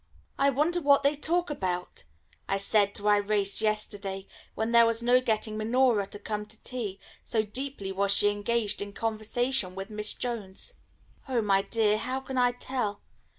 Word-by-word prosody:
"I 275 +1 +5
wonder 310 +6 +1
what 280 -2 +5
they 280 +1 +4
talk 335 +3 0
about?" 180 - -3 0.4
I 195 - +2
said 200 0 +2
to 205 - -1
Irais 205 -1 +2
yesterday, 205 -3 -2 0.3
when 220 +1 -1
there 235 -1 +7
was 230 0 0
no 250 +1 +5
getting 215 -2 -1
Minora 225 -2 +2
to 205 - -8
come 210 0 -4
to 220 +1 -11
tea, 215 -6 -4 0.2
so 220 -2 0
deeply 250 -2 -4
was 195 +1 +1
she 205 +1 +4
engaged 205 +1 -1
in 200 0 -5
conversation 220 -2 -1
with 195 +3 -6
Miss 210 0 -3
Jones. 230 - -5 0.6
"Oh, 240 -4 +1
my 195 -1 +3
dear, 215 +1 +1
how 255 +3 -2
can 265 -1 -3
I 245 0 +4
tell? 245 -4 -3
215 Hz, 170 wpm, -28 LUFS, 205-250 Hz, 0.6 s, there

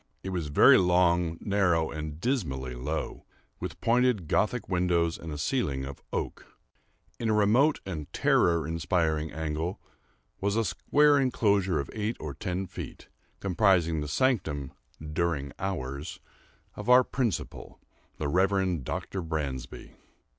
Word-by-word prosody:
It 95 - -4
was 90 -5 -2
very 75 - +7
long, 90 -2 +3
narrow, 90 -6 +1
and 75 -1 -6
dismally 70 - -2
low, 65 +6 -4 0.4
with - - -6
pointed 120 -6 +2
Gothic 110 +8 0
windows 90 -2 +1
and 80 - -7
a 75 - -5
ceiling 75 - -1
of 70 -1 -8
oak. - - -5 0.6
In 115 - -1
a 110 - +3
remote 120 +9 +3
and 80 -6 -6
terror 85 -3 +2
inspiring 80 -1 0
angle 80 +3 -3 0.6
was 100 +1 0
a 115 0 +1
square 145 +4 +3
enclosure 100 - +2
of 70 - -4
eight 110 +1 -2
or 75 -2 -5
ten 90 +7 -3
feet, - - -9 0.3
comprising 90 -5 +2
the 75 - -4
sanctum, 75 - 0 0.4
"during 75 -4 -1
hours," 75 -6 -4 0.5
of 105 +3 -6
our 125 +1 +8
principal, 120 -6 -3 0.4
the 75 - -2
Reverend 95 -1 +1
Dr. 95 +8 -4
Bransby. 75 -6 -4
90 Hz, 130 wpm, -28 LUFS, 75-100 Hz, 0.6 s, our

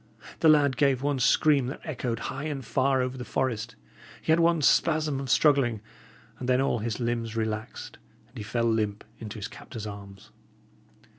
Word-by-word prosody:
The 160 - +5
lad 145 -4 +4
gave 140 -3 +2
one 145 -2 0
scream 140 +1 +3
that 135 - -6
echoed 125 -6 -3
high 140 +3 -5
and 140 -5 -4
far 130 0 +1
over 130 +1 -4
the - - -4
forest, 120 -3 -2 0.4
he - - -1
had 160 - +4
one 165 -2 +3
spasm 155 -2 +2
of 135 -1 -5
struggling, 135 -6 +3 0.6
and 125 - -4
then 125 0 +3
all 135 -3 +1
his 110 +1 -3
limbs 115 -2 -2
relaxed, 110 0 -4 0.3
and - - -29
he - - -6
fell 115 +3 -1
limp 110 -3 0 0.2
into 110 -1 -7
his 105 0 -5
captor's 115 -2 -9
arms. 100 -2 -10
125 Hz, 175 wpm, -27 LUFS, 115-140 Hz, 0.6 s, The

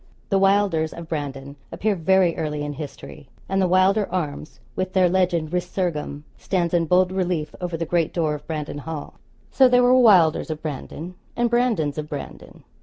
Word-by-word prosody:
The 195 - +2
Wylders 195 -5 +2
of 170 -1 -8
Brandon 140 -2 -5
appear 210 -1 0
very 185 0 +3
early 150 -2 -3
in 145 - -4
history; 145 -1 -9 0.2
and 195 0 0
the 185 - +3
Wylder 190 +3 +3
arms, 155 -4 -4 0.2
with 185 0 -3
their 185 -2 +4
legend, 175 -3 0
'resurgam,' 170 -5 -2 0.2
stands 175 -3 -1
in 170 -1 +2
bold 180 +2 +3
relief 180 -5 -2
over 175 -2 -3
the 165 - -2
great 170 -1 0
door 160 -3 0
of 150 0 -8
Brandon 150 -2 -4
Hall. 155 0 -7 0.3
So 265 -1 +6
there 250 0 +4
were 245 +1 +5
Wylders 185 -12 +5
of 155 -1 -4
Brandon, 155 +3 -6 0.2
and 240 -1 0
Brandons 220 - +1
of 150 0 -6
Brandon. 145 - -8
170 Hz, 180 wpm, -23 LUFS, 150-190 Hz, 0.3 s, So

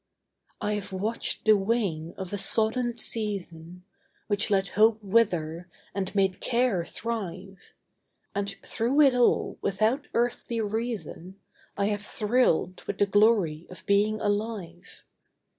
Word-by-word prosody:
I 210 - -1
have 205 -2 -4
watched 210 +5 -2
the 215 -1 +7
wane 195 -6 -1
of 190 0 -6
a - - -1
sodden 235 +3 +1
season, 180 -7 -4 0.4
Which 205 +1 0
let 195 -2 +1
hope 215 +2 +4
wither, 180 -5 +1 0.2
and 195 0 -3
made 195 -2 +1
care 235 -7 +1
thrive, 195 -3 -5 0.7
And 200 0 -2
through 245 +6 +1
it 275 -3 +6
all, 245 -1 +2
without 220 +8 0
earthly 235 0 -1
reason, 215 -4 -4 0.4
I 200 - +1
have 205 -1 -2
thrilled 210 -5 +1
with 200 - -3
the 205 - +4
glory 200 -6 +2
of 185 - -12
being 210 +2 +2
alive. 205 -5 -4
205 Hz, 125 wpm, -27 LUFS, 185-225 Hz, 0.7 s, the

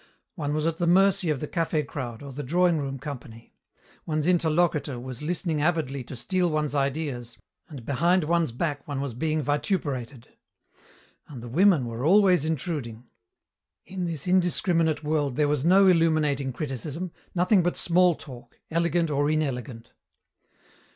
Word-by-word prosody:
One 150 -4 -3
was 155 0 -1
at 165 0 0
the 175 - 0
mercy 190 0 +4
of 150 -4 -1
the 150 - -3
café 165 -3 -1
crowd 125 -4 -6
or 140 - -8
the 145 - -5
drawing 170 +4 +2
room 135 -1 -4
company. 120 -5 -9 0.5
One's 155 -2 -1
interlocutor 165 -5 +1
was 125 0 -7
listening 160 -1 -1
avidly 150 -5 0
to 130 - -8
steal 180 +8 0
one's 150 -2 -1
ideas, 135 -4 -2 0.3
and 135 -7 -9
behind 170 +7 +2
one's 165 -2 +1
back 145 +2 -3
one 140 -2 -3
was 140 -3 -3
being 155 +5 -1
vituperated. 145 - -2 1.0
And 130 -6 -10
the - - -7
women 165 - +3
were 115 +1 -5
always 180 -1 +4
intruding. 140 -7 -4 0.8
In 185 -1 -4
this 160 -5 -4
indiscriminate 175 -3 +2
world 150 -3 0
there 150 +1 +2
was 145 -2 0
no 190 +4 +5
illuminating 155 -6 +2
criticism, 150 +6 -5 0.2
nothing 180 +2 +4
but 175 +1 -1
small 175 0 +3
talk, 120 -5 -13
elegant 170 0 +1
or 145 +1 +1
inelegant. 130 -6 -3
150 Hz, 150 wpm, -26 LUFS, 135-170 Hz, 1.0 s, no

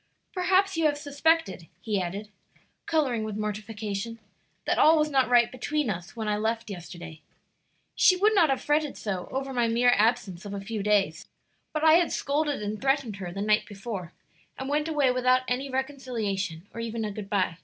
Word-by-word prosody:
Perhaps 380 0 +2
you 325 - +2
have 290 -1 0
suspected," 285 - 0
he 205 0 -1
added, 200 +4 -5 0.6
coloring 265 -9 +1
with 215 -1 -4
mortification, 215 +1 -4 0.5
"that - - +1
all 320 +1 +6
was 305 0 +1
not 265 -3 +3
right 240 -1 +5
between 280 0 -1
us 175 +1 -7
when 220 -2 -4
I 210 0 +1
left 225 0 -2
yesterday. 175 -3 -9 0.7
She 370 - +5
would 415 +4 +3
not 345 -7 +5
have 270 - 0
fretted 295 0 0
so 190 -4 -4
over 270 0 -3
my 240 -2 +2
mere 240 +2 +4
absence 205 -4 +1
of 200 -1 -6
a - - -4
few 210 +2 -4
days, 195 -6 +1 0.4
but 310 0 -2
I 320 +1 +7
had 345 - 0
scolded 290 -4 -1
and 210 +1 -4
threatened 270 -6 0
her 180 -3 -6
the 195 +3 -4
night 215 +1 +2
before, 195 -4 -6 0.5
and 265 - -5
went 300 +2 0
away 290 -5 +2
without 255 0 +3
any 260 +3 -1
reconciliation 230 - -3
or - - -7
even 230 -1 -3
a 210 - -3
good 200 -1 -7
by. 185 -4 0
230 Hz, 185 wpm, -27 LUFS, 205-285 Hz, 0.7 s, I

